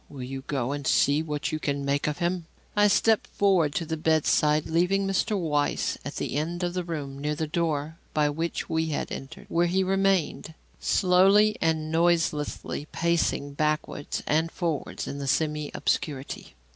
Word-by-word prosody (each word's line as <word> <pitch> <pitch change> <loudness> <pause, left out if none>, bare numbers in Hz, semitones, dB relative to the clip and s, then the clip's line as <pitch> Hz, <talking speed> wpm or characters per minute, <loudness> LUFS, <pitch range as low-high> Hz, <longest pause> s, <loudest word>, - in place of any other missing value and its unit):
Will 135 -3 -8
you 135 +1 -5
go 135 -3 -1
and 145 -1 -3
see 145 +2 +3
what 150 -2 -3
you 155 - -2
can 140 -2 -2
make 140 +1 0
of 150 - -1
him?" 175 -1 -1 0.3
I 205 0 +5
stepped 220 +2 +3
forward 180 -7 +2
to 170 - -1
the 160 0 -3
bedside, 155 -1 +2
leaving 180 +4 +1
Mr. 195 +2 0
Weiss 150 -4 0
at - - -6
the - - -2
end 170 +4 -2
of 175 0 -1
the 180 0 -2
room 145 -5 -5
near 150 +1 -1
the 155 - -2
door 155 -1 -2
by 150 -1 +2
which 165 +3 -2
we 160 0 0
had 150 - -3
entered, 135 - -7
where 170 +1 +2
he 190 +2 +2
remained, 190 -4 0 0.2
slowly 195 +3 +4
and 160 -1 0
noiselessly 160 -3 0
pacing 170 -4 0
backwards 155 0 -2
and 160 +2 +1
forwards 165 -5 -3
in 140 - -5
the 140 - -4
semi 150 +1 0
obscurity. 140 -3 -2
160 Hz, 170 wpm, -26 LUFS, 145-175 Hz, 0.3 s, I